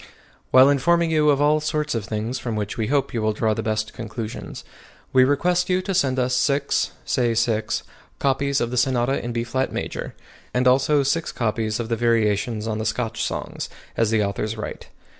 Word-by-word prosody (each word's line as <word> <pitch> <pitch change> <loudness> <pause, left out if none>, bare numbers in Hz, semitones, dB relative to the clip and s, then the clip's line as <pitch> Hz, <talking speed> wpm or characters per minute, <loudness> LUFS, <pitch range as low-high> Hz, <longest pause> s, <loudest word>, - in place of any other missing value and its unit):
While 130 +1 +7
informing 170 +4 +2
you 155 -1 +3
of 140 -1 +3
all 150 +1 +4
sorts 150 0 -1
of 115 -4 -2
things 110 +5 -3
from 115 -3 -3
which 105 -1 -3
we 110 -2 -1
hope 140 0 0
you 115 - -1
will 110 0 +1
draw 110 0 +1
the 110 - -3
best 110 0 -2
conclusions, 115 -1 -6 0.5
we 130 - +6
request 175 +7 +2
you 180 0 +3
to 195 - -2
send 135 -8 +1
us 125 0 +1
six 140 +2 +1 0.2
(say 120 -3 +1
6) 115 -1 0 0.3
copies 140 +1 +1
of 120 0 -1
the 125 - -2
Sonata 130 +1 +1
in 120 - -3
B 115 0 -1
flat 130 +2 -1
major, - - -5 0.4
and 125 +1 +3
also 140 +3 +4
six 160 +4 0
copies 110 -2 -1
of 115 - -3
the 115 - +1
variations 110 -1 +1
on 110 -1 -2
the 110 - -3
Scotch 110 +1 -2
songs, - - -4 0.3
as 115 -2 +2
the 110 -1 +2
author's 105 +2 -2
right. 110 - -6
120 Hz, 195 wpm, -23 LUFS, 110-140 Hz, 0.5 s, While